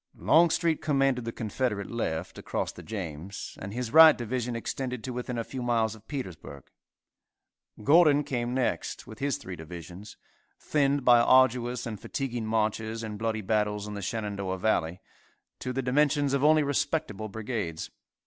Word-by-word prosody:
Longstreet 165 Hz, 0 st, +3 dB
commanded 135 Hz, -4 st, +1 dB
the 115 Hz, -, -3 dB
Confederate 110 Hz, -2 st, -2 dB
left, 90 Hz, -8 st, -3 dB
across -, -, -3 dB
the -, -, -11 dB
James, 95 Hz, -3 st, -6 dB
and 95 Hz, -, -6 dB
his 120 Hz, +1 st, -4 dB
right 160 Hz, -1 st, +9 dB
division 120 Hz, 0 st, -3 dB
extended 125 Hz, 0 st, -4 dB
to 130 Hz, -, -4 dB
within 125 Hz, 0 st, -4 dB
a 115 Hz, -, -1 dB
few 130 Hz, +2 st, -6 dB
miles 115 Hz, -3 st, +1 dB
of 110 Hz, -1 st, -16 dB
Petersburg. 80 Hz, -, -7 dB, 1.1 s
Gordon 150 Hz, +1 st, +5 dB
came 120 Hz, -2 st, -2 dB
next, 130 Hz, -2 st, -2 dB
with 110 Hz, -4 st, -11 dB
his 140 Hz, -1 st, 0 dB
three 95 Hz, -, -8 dB
divisions, 85 Hz, +4 st, -10 dB, 0.4 s
thinned 140 Hz, -2 st, +1 dB
by 120 Hz, -1 st, +7 dB
arduous 125 Hz, -1 st, +3 dB
and 110 Hz, -3 st, -5 dB
fatiguing 120 Hz, -5 st, -4 dB
marches 110 Hz, +1 st, -1 dB
and 105 Hz, -2 st, -6 dB
bloody 110 Hz, -1 st, -1 dB
battles 105 Hz, 0 st, 0 dB
in 105 Hz, -, -6 dB
the 100 Hz, -, -5 dB
Shenandoah 100 Hz, -2 st, -3 dB
Valley, 90 Hz, -3 st, 0 dB, 0.6 s
to 125 Hz, -, -4 dB
the 135 Hz, +1 st, -2 dB
dimensions 145 Hz, +2 st, +2 dB
of 140 Hz, 0 st, +1 dB
only 155 Hz, 0 st, +5 dB
respectable 135 Hz, -7 st, -1 dB
brigades. 105 Hz, -6 st, -4 dB
115 Hz, 155 wpm, -28 LUFS, 105-130 Hz, 1.1 s, right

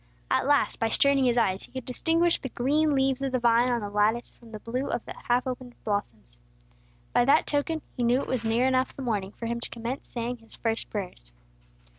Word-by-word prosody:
At -, -, +2 dB
last, 290 Hz, -1 st, +2 dB
by 225 Hz, -, +1 dB
straining 280 Hz, +2 st, +3 dB
his 245 Hz, -1 st, +2 dB
eyes 195 Hz, -5 st, +2 dB
he -, -, -12 dB
could 260 Hz, -2 st, -6 dB
distinguish 330 Hz, +6 st, +1 dB
the 265 Hz, -, -5 dB
green 290 Hz, +5 st, +1 dB
leaves 270 Hz, 0 st, +1 dB
of 270 Hz, -1 st, -1 dB
the 255 Hz, -, +1 dB
vine 235 Hz, +1 st, +4 dB
on 240 Hz, -2 st, 0 dB
the 205 Hz, -, -4 dB
lattice 215 Hz, +3 st, +1 dB
from 235 Hz, -2 st, -17 dB
the 215 Hz, -, -6 dB
blue 250 Hz, +5 st, -3 dB
of -, -, -2 dB
the -, -, -7 dB
half 245 Hz, +1 st, +2 dB
opened 255 Hz, -1 st, -5 dB
blossoms. 115 Hz, -, -3 dB, 0.7 s
By 245 Hz, -, +5 dB
that 290 Hz, +4 st, +5 dB
token 300 Hz, +2 st, -1 dB
he 250 Hz, -, -3 dB
knew 240 Hz, +2 st, +3 dB
it -, -, -4 dB
was 250 Hz, -3 st, -1 dB
near 230 Hz, +3 st, +2 dB
enough 260 Hz, 0 st, +1 dB
the 270 Hz, -, -6 dB
morning 205 Hz, -5 st, -1 dB
for 230 Hz, -, -7 dB
him 235 Hz, +1 st, -2 dB
to -, -, -4 dB
commence 235 Hz, +3 st, -5 dB
saying 240 Hz, +1 st, -3 dB
his 225 Hz, -1 st, -12 dB
first 225 Hz, -1 st, -2 dB
prayers. 180 Hz, -, -6 dB
245 Hz, 225 wpm, -27 LUFS, 225-265 Hz, 0.7 s, By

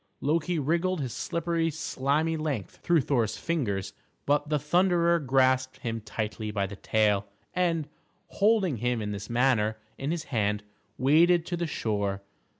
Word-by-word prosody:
Loki 165 Hz, +4 st, 0 dB
wriggled 170 Hz, +5 st, 0 dB
his 130 Hz, -5 st, -3 dB
slippery, 170 Hz, 0 st, -1 dB
slimy 155 Hz, +1 st, 0 dB
length 150 Hz, -10 st, -3 dB
through 170 Hz, -3 st, +2 dB
Thor's 115 Hz, -6 st, 0 dB
fingers; 100 Hz, -, -2 dB, 0.3 s
but 145 Hz, +1 st, +1 dB
the 150 Hz, -, +2 dB
Thunderer 170 Hz, +3 st, +3 dB
grasped 130 Hz, -2 st, +2 dB
him 115 Hz, -2 st, -3 dB
tightly 110 Hz, 0 st, -4 dB
by 100 Hz, -2 st, -1 dB
the 100 Hz, +1 st, -7 dB
tail, 105 Hz, -1 st, +1 dB, 0.3 s
and, 170 Hz, -4 st, 0 dB, 0.4 s
holding 200 Hz, -, +2 dB
him 120 Hz, +1 st, 0 dB
in 105 Hz, -1 st, -3 dB
this 100 Hz, 0 st, -6 dB
manner 120 Hz, -3 st, +2 dB, 0.2 s
in 135 Hz, -, -2 dB
this 165 Hz, -1 st, -2 dB
hand, 105 Hz, -2 st, +1 dB, 0.3 s
waded 165 Hz, +5 st, +4 dB
to 175 Hz, -, -2 dB
the 170 Hz, -1 st, -2 dB
shore. 100 Hz, -7 st, -2 dB
140 Hz, 150 wpm, -28 LUFS, 110-165 Hz, 0.4 s, waded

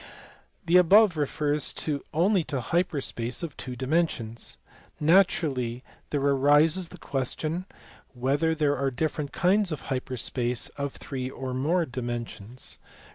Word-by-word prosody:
The 175 Hz, +1 st, +5 dB
above 190 Hz, +2 st, +6 dB
refers 150 Hz, -1 st, 0 dB, 0.4 s
only 180 Hz, +3 st, +3 dB
to 140 Hz, -, -2 dB
hyper 165 Hz, +3 st, 0 dB
space 120 Hz, +3 st, -3 dB
of 160 Hz, -4 st, -5 dB
two 125 Hz, -1 st, -6 dB
dimensions. 130 Hz, -5 st, -1 dB, 0.4 s
Naturally 150 Hz, -8 st, +2 dB, 0.3 s
there 145 Hz, -, -1 dB
arises 145 Hz, +5 st, +4 dB
the -, -, -11 dB
question 155 Hz, +7 st, -2 dB, 0.5 s
whether 140 Hz, +6 st, +1 dB
there 150 Hz, -2 st, +2 dB
are 135 Hz, -1 st, 0 dB
different 145 Hz, +1 st, -2 dB
kinds 190 Hz, +1 st, +2 dB
of 155 Hz, -, -4 dB
hyper 130 Hz, 0 st, -3 dB
space 120 Hz, +1 st, -1 dB
of 140 Hz, -1 st, -4 dB
three 130 Hz, -2 st, -5 dB
or 130 Hz, -1 st, -5 dB
more 160 Hz, +7 st, +1 dB
dimensions. 120 Hz, -3 st, -6 dB
145 Hz, 130 wpm, -27 LUFS, 130-165 Hz, 0.5 s, above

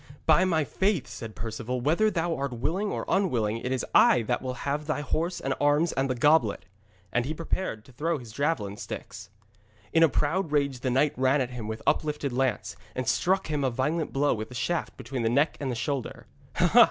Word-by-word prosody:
'By 165 Hz, +4 st, +5 dB
my 160 Hz, -4 st, +2 dB
faith,' 190 Hz, -, 0 dB
said 115 Hz, -3 st, -8 dB
Perceval, 115 Hz, +3 st, -4 dB
'whether 165 Hz, -, +3 dB
thou 170 Hz, -4 st, -1 dB
art 140 Hz, -2 st, -3 dB
willing 170 Hz, -, -1 dB
or -, -, -3 dB
unwilling, 120 Hz, -, +1 dB
it 125 Hz, -, -4 dB
is 130 Hz, -, -1 dB
I 120 Hz, -, +6 dB
that 120 Hz, +3 st, -1 dB
will 130 Hz, -1 st, -4 dB
have 145 Hz, +2 st, -1 dB
thy 155 Hz, -2 st, -1 dB
horse 165 Hz, +5 st, -1 dB
and 135 Hz, -, -1 dB
arms 145 Hz, +3 st, +3 dB
and 135 Hz, 0 st, -1 dB
the 130 Hz, -, 0 dB
goblet.' 120 Hz, -7 st, +3 dB, 0.5 s
And 120 Hz, -, +2 dB
he 150 Hz, +5 st, -3 dB
prepared 165 Hz, -, -3 dB
to -, -, -16 dB
throw 160 Hz, +6 st, -1 dB
his 120 Hz, -5 st, -10 dB
javelin 110 Hz, -6 st, -1 dB
sticks. -, -, -7 dB, 0.6 s
In 165 Hz, -, +4 dB
a 165 Hz, -, +7 dB
proud 160 Hz, +4 st, 0 dB
rage 140 Hz, -3 st, +1 dB
the 130 Hz, -, -1 dB
knight 135 Hz, +4 st, +2 dB
ran 130 Hz, +2 st, +3 dB
at 130 Hz, -1 st, -1 dB
him 120 Hz, -4 st, -6 dB
with 110 Hz, 0 st, -5 dB
uplifted 150 Hz, -3 st, 0 dB
lance, 130 Hz, 0 st, -1 dB, 0.2 s
and 130 Hz, 0 st, -3 dB
struck 190 Hz, +7 st, +2 dB
him 150 Hz, -2 st, -1 dB
a 130 Hz, -, +2 dB
violent 150 Hz, +6 st, -1 dB
blow 145 Hz, +1 st, +2 dB
with 110 Hz, -1 st, -5 dB
the 125 Hz, -, -10 dB
shaft 170 Hz, +7 st, -2 dB
between 125 Hz, +1 st, -4 dB
the 115 Hz, -, +1 dB
neck 140 Hz, +6 st, +2 dB
and 140 Hz, -, -2 dB
the 125 Hz, -, -2 dB
shoulder. 125 Hz, +2 st, -3 dB
140 Hz, 210 wpm, -27 LUFS, 125-160 Hz, 0.6 s, a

